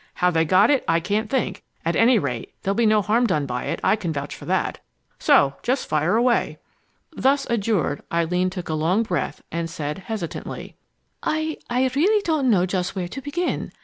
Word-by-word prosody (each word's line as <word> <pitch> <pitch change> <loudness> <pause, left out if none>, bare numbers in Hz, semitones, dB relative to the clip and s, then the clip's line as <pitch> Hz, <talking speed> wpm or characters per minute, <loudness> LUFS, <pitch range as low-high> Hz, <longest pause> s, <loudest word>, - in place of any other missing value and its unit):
How 180 0 +2
they 165 -1 +2
got 190 - +5
it, 275 - +2
I 165 0 +3
can't 205 +5 -1
think. 260 -3 -1 0.2
At 170 - +1
any 235 +1 +5
rate, 125 - -3
there'll 195 - +1
be 225 +2 +2
no 215 -1 +4
harm 230 +5 +2
done 155 -8 0
by 125 -2 -3
it, - - -2
I - - +4
can 190 -6 -3
vouch 145 -1 -4
for - - -10
that. - - -1 0.4
So 140 0 +4
just 255 +2 -1
fire 155 +6 +1
away!" 240 +1 +2 0.6
Thus 275 +1 +2
adjured, 205 -10 0
Eileen 180 +2 +1
drew 185 -1 -5
a 160 - -3
long 170 +8 +2
breath 180 -6 -3
and 170 0 -2
said 150 -1 -4
hesitantly: 195 -4 -6 0.5
"I 315 0 -1
I 250 +2 +2
really 405 +8 +3
don't 310 -7 +1
know 185 -5 +4
just 185 0 -2
where 180 -2 -2
to 270 - -6
begin. 320 +6 -2
195 Hz, 195 wpm, -23 LUFS, 165-245 Hz, 0.6 s, got